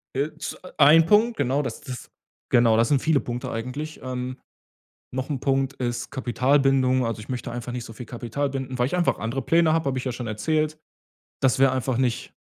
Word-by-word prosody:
Äh, 145 +3 0
z - - -5 0.2
ein 155 +3 +7
Punkt, 225 +4 +4
genau. 140 +1 +1
Das 130 - -3
ist - - -16
das 125 - -7 0.4
genau, 115 -2 +5
das 115 0 +3
sind 140 -3 +3
viele 155 -3 +3
Punkte 125 +1 -5
eigentlich. 130 +7 -5
Ähm, 130 0 -4 0.8
noch 130 +3 -3
'n 135 -3 -2
Punkt 135 -1 0
ist 120 -1 -3
Kapitalbindung. 130 0 +2
Also, 115 -1 -3
ich 105 - -11
möchte 125 -1 -4
einfach 120 0 -5
nicht 125 -2 -4
so 115 - -9
viel 115 +1 -9
Kapital 120 +5 -3
binden, 130 -1 -4
weil 125 - +2
ich 180 - -2
einfach 175 - +1
andere 120 +5 -3
Pläne 165 -1 +3
habe, 160 -3 +1
habe 130 -1 0
ich 125 - -4
ja 130 - -2
schon 120 -1 -6
erzählt. 155 +8 -1 0.6
Das 130 0 +3
wäre 135 -1 +5
einfach 130 -1 -1
nicht 125 -3 -1
130 Hz, 210 wpm, -24 LUFS, 120-145 Hz, 0.8 s, ein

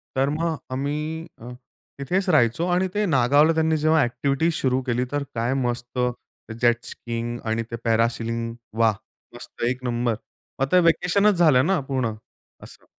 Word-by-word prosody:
तर 135 +1 +2
मग 160 +2 -1 0.2
आम्ही 150 +5 -3
अ, 120 +2 -9 0.5
तिथेच 185 +8 -1
राहायचो 150 +2 +3
आणि 185 +1 +2
ते 210 0 +1
नागावला 145 +1 +4
त्यांनी 160 0 +1
जेव्हा 155 +1 +3
अ‍ॅक्टिव्हिटीज 140 +6 0
सुरू 130 0 +1
केली 125 +1 0
तर 145 -1 -1
काय 120 +3 0
मस्त 120 +1 -3 0.6
जेट 120 0 +3
स्कीइंग 120 0 -5
आणि 115 +1 0
ते - - -2
पॅरासेलिंग 115 0 0 0.3
वाह! 110 -2 +4 0.4
मस्त - - -9
एक 130 +1 -4
नंबर. 120 -2 0 0.4
मग 135 - +2
ते 180 - +6
व्हॅकेशनच 180 +4 +3
झालं 150 -6 +4
ना 190 -2 +2
पूर्ण 130 -5 -1 0.5
असं. - - -13
135 Hz, 150 wpm, -23 LUFS, 120-160 Hz, 0.6 s, ते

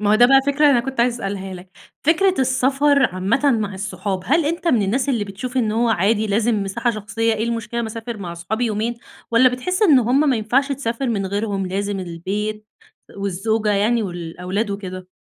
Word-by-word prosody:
ما 205 -1 +1
هو 215 - +5
ده 240 +2 +6
بقى 270 +1 +6
فكرة، 285 +1 +4
أنا 245 -3 +4
كنت 265 0 -3
عايزة 240 0 +2
أسألها 195 -1 -4
لَك. 180 +1 -12 0.4
فكرة 370 +4 +4
السفر 270 +2 +2
عامةً 190 +8 0 0.2
مع 205 -2 -3
الصحاب، 190 0 -3
هل 315 +6 +2
أنتَ 335 +3 -1
من 240 -8 +3
الناس 250 +8 0
اللي 230 -6 0
بتشوف 240 +6 -7
إنّه 220 -4 +1
هو - - +2
عادي 215 +1 +2
لازم 215 0 +1
مساحة 235 +5 -1
شخصيّة، 225 +1 -1
إيه 220 - -2
المشكلة 235 0 -3
ما 230 - -2
أسافر 230 +1 -6
مع 180 -4 -6
أصحابي 205 +8 -3
يومين 220 +2 -1 0.4
والّا 235 +2 +6
بتحس 310 - -2
إن 310 -10 +6
هم 260 +5 +2
ما 250 - +2
ينفعش 245 +6 +1
تسافر 255 -1 -3
من 200 -4 -1
غيرهم 200 0 -2
لازم 200 +1 -2
البيت 200 +5 -4 0.5
والزوجة 200 +3 -1
يعني 215 +3 +2
والأولاد 180 +3 -4
وكده؟ 185 -2 -6
220 Hz, 195 wpm, -20 LUFS, 200-250 Hz, 0.5 s, ده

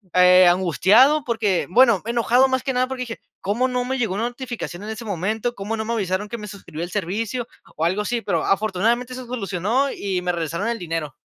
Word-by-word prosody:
eh, 180 0 +7
angustiado 195 - +4
porque, 220 -6 0
bueno, 235 -1 +5
enojado 240 +2 +3
más 260 -1 -1
que 270 - -1
nada 255 +1 +1
porque 265 -1 -5
dije: 235 -2 -5 0.2
"¿Cómo 235 +6 0
no 250 -1 -1
me 265 +1 -2
llegó 220 -7 -1
la 225 - -1
notificación 240 -6 -5
en 215 - -6
ese 220 +2 -6
momento? 215 +5 -2
¿Cómo 205 +3 -3
no 220 - -2
me 230 - -3
avisaron 200 -1 -2
que 235 - -5
me 210 -1 -8
suscribió 185 -5 -8
el 175 - -6
servicio?", 215 +5 -2 0.3
o 155 - -3
algo 190 +5 0
así, 235 +2 -2
pero - - -1
afortunadamente 220 +5 0
se 255 0 -7
solucionó 230 +3 -1
y 190 -3 -3
me 180 0 0
regresaron 170 +5 -2
el 235 - -2
dinero. 165 -4 -4
215 Hz, 215 wpm, -22 LUFS, 185-245 Hz, 0.3 s, eh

